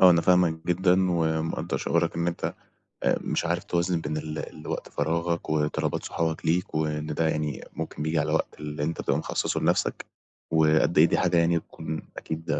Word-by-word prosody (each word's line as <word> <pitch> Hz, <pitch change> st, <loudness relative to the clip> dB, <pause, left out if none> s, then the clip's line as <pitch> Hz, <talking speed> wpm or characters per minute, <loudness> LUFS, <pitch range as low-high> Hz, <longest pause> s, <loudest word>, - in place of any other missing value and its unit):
آه 95 Hz, -, +9 dB
أنا 85 Hz, -1 st, +5 dB
فاهمك 85 Hz, -2 st, +3 dB
جدًا 90 Hz, +1 st, +3 dB
ومقدّر 80 Hz, -1 st, 0 dB
شعورك -, -, 0 dB
إن 85 Hz, 0 st, 0 dB
أنت 85 Hz, -, -2 dB, 0.5 s
أ -, -, +3 dB
مش -, -, -1 dB
عارف 85 Hz, +1 st, 0 dB
توازن 85 Hz, 0 st, 0 dB
بين 75 Hz, -, -3 dB
ال 75 Hz, 0 st, -4 dB, 0.3 s
الوقت -, -, -4 dB
فراغك 85 Hz, +3 st, -1 dB
وطلبات 75 Hz, -1 st, 0 dB
صحابك 80 Hz, -1 st, -2 dB
ليك 85 Hz, +1 st, 0 dB
وإن 75 Hz, -1 st, -1 dB
ده 80 Hz, +1 st, 0 dB
يعني 75 Hz, -2 st, -2 dB
ممكن 80 Hz, -2 st, -5 dB
بييجي 80 Hz, +1 st, +1 dB
على -, -, 0 dB
وقت -, -, 0 dB
اللي 75 Hz, -1 st, -4 dB
أنت 80 Hz, +2 st, -2 dB
تبقى 70 Hz, -, +1 dB
مخصّصه -, -, -1 dB
لنفسك، -, -, +1 dB, 0.5 s
وقد 80 Hz, +1 st, +3 dB
إيه 80 Hz, -, +9 dB
دي -, -, +2 dB
حاجة 90 Hz, -1 st, +2 dB
يعني 85 Hz, 0 st, +3 dB
تكون 80 Hz, 0 st, -6 dB, 0.2 s
أكيد 80 Hz, 0 st, -5 dB
80 Hz, 180 wpm, -27 LUFS, 80-85 Hz, 0.5 s, آه